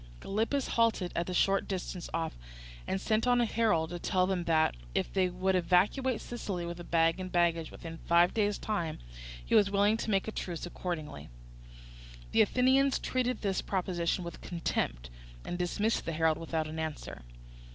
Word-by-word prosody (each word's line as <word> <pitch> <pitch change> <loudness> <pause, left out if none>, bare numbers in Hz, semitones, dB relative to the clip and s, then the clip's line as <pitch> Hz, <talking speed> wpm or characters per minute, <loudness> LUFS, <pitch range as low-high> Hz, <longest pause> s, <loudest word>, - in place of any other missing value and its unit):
Gylippus 225 +7 -1
halted 225 -6 +2
at 170 +1 -1
a - - -2
short 195 +2 +2
distance 185 -2 -4
off 165 -1 -2 0.5
and 190 - -1
sent 220 +4 +1
on 245 0 +4
a 240 - +3
herald 210 -9 +1
to 175 - -4
tell 185 +1 +1
them 185 -2 -1
that, 160 - +3 0.2
if - - -1
they 185 -1 +2
would 185 +2 0
evacuate 200 +8 +2
Sicily 195 -7 -4
with 170 0 -7
bag 165 +1 +3
and 185 -1 -5
baggage 170 -2 +2
within 165 -1 -9
five 170 +1 +4
days' 205 -2 +1
time, 170 -8 -2 0.5
he - - -3
was 200 -1 +6
willing 205 +2 +3
to 230 - -4
make 195 -1 +1
a - - -2
truce 175 -5 -4
accordingly. 165 - -5 1.0
The - - +5
Athenians 260 +5 +3
treated 250 -2 -1
this 195 -3 0
proposition 180 -2 -1
with 170 - -8
contempt, - - -2 0.3
and - - -3
dismissed 205 +5 0
the 165 - -2
herald 160 0 +2
without 160 -1 -2
an 160 +1 -6
answer. 160 - -5
180 Hz, 170 wpm, -31 LUFS, 170-210 Hz, 1.0 s, was